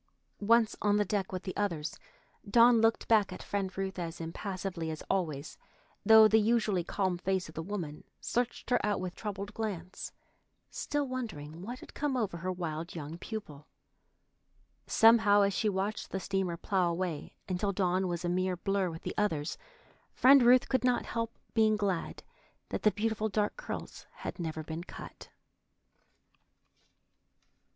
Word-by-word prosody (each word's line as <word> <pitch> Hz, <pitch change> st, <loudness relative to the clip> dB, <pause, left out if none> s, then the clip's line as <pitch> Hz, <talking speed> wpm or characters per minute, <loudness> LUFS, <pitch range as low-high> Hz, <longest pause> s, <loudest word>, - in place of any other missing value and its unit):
Once 225 Hz, +1 st, +4 dB
on 205 Hz, 0 st, +3 dB
the 210 Hz, -, +2 dB
deck 200 Hz, -1 st, -1 dB
with 185 Hz, 0 st, -4 dB
the 185 Hz, -, -5 dB
others, 165 Hz, -7 st, -2 dB, 0.5 s
Dawn 235 Hz, +1 st, +6 dB
looked 225 Hz, 0 st, +2 dB
back 215 Hz, -3 st, +4 dB
at -, -, -7 dB
Friend 195 Hz, -2 st, -3 dB
Ruth 190 Hz, -1 st, -3 dB
as 170 Hz, -1 st, -5 dB
impassively 175 Hz, 0 st, -4 dB
as 155 Hz, -1 st, -5 dB
always, 155 Hz, -6 st, -2 dB, 0.4 s
though 220 Hz, -1 st, +9 dB
the 220 Hz, +1 st, +5 dB
usually 215 Hz, -4 st, +2 dB
calm 185 Hz, 0 st, -1 dB
face 190 Hz, 0 st, -1 dB
of 155 Hz, -, -12 dB
the 160 Hz, -, -4 dB
woman 165 Hz, -5 st, -5 dB, 0.2 s
searched 245 Hz, 0 st, -2 dB
her 245 Hz, -, +3 dB
out 205 Hz, -1 st, +1 dB
with 180 Hz, -1 st, -4 dB
troubled 200 Hz, -1 st, -5 dB
glance, 190 Hz, -5 st, -5 dB, 0.6 s
still 290 Hz, -1 st, -2 dB
wondering 175 Hz, -, -5 dB
what 240 Hz, +6 st, -6 dB
had -, -, -12 dB
come 285 Hz, -3 st, -1 dB
over 200 Hz, -7 st, -1 dB
her 185 Hz, +2 st, -3 dB
wild 170 Hz, -2 st, -4 dB
young 160 Hz, +1 st, -6 dB
pupil. 155 Hz, -10 st, -7 dB, 1.2 s
Somehow, 225 Hz, -2 st, +6 dB
as 200 Hz, 0 st, +2 dB
she 215 Hz, -, +1 dB
watched 200 Hz, +2 st, -2 dB
the 190 Hz, -, -3 dB
steamer 190 Hz, -2 st, -1 dB
plough 185 Hz, 0 st, +1 dB
away 170 Hz, -3 st, -3 dB
until 190 Hz, +2 st, 0 dB
Dawn 185 Hz, -1 st, +1 dB
was 175 Hz, 0 st, -3 dB
a -, -, +1 dB
mere 185 Hz, 0 st, 0 dB
blur 195 Hz, 0 st, 0 dB
with 165 Hz, 0 st, -8 dB
the -, -, -3 dB
others, 160 Hz, -8 st, 0 dB, 0.6 s
Friend 270 Hz, +2 st, +7 dB
Ruth 245 Hz, +1 st, +6 dB
could 260 Hz, -1 st, +1 dB
not 250 Hz, -1 st, +2 dB
help 230 Hz, 0 st, -3 dB, 0.2 s
being 220 Hz, -1 st, +4 dB
glad 195 Hz, -5 st, -2 dB, 0.5 s
that -, -, -3 dB
the 215 Hz, -, +5 dB
beautiful 220 Hz, +1 st, -1 dB
dark 210 Hz, 0 st, 0 dB
curls -, -, -7 dB
had -, -, -7 dB
never 160 Hz, -2 st, -3 dB
been 160 Hz, +2 st, -5 dB
cut. -, -, -10 dB
195 Hz, 160 wpm, -31 LUFS, 175-220 Hz, 1.2 s, though